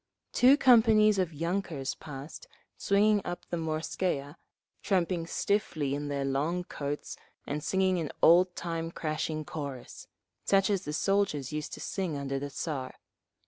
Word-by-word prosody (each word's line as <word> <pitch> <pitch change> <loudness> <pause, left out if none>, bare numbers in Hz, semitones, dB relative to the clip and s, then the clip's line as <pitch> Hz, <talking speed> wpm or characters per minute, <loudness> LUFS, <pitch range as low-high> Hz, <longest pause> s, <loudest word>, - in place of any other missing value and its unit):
Two 260 +3 +6
companies 220 -5 +5
of 185 -3 +1
yunkers 165 -3 -2
passed 145 0 -9 0.3
swinging 205 +1 +3
up 175 0 -5
the - - 0
Morskaya, 155 -2 -2 0.5
tramping 175 -3 0
stiffly 165 -9 -1
in 145 +1 -3
their 140 -1 -2
long 150 +7 0
coats 145 -3 -5 0.3
and 150 +1 -3
singing 190 0 +1
an 155 -4 -3
oldtime 170 -1 +3
crashing 155 -1 -3
chorus, 140 -5 -7 0.4
such 195 0 +3
as 195 -1 -1
the 150 - -4
soldiers 170 -7 0
used 150 0 -4
to - - -6
sing 180 -7 -3
under 135 -1 -3
the 145 +1 -5
Tsar…. 135 -3 -4
165 Hz, 140 wpm, -29 LUFS, 145-190 Hz, 0.5 s, Two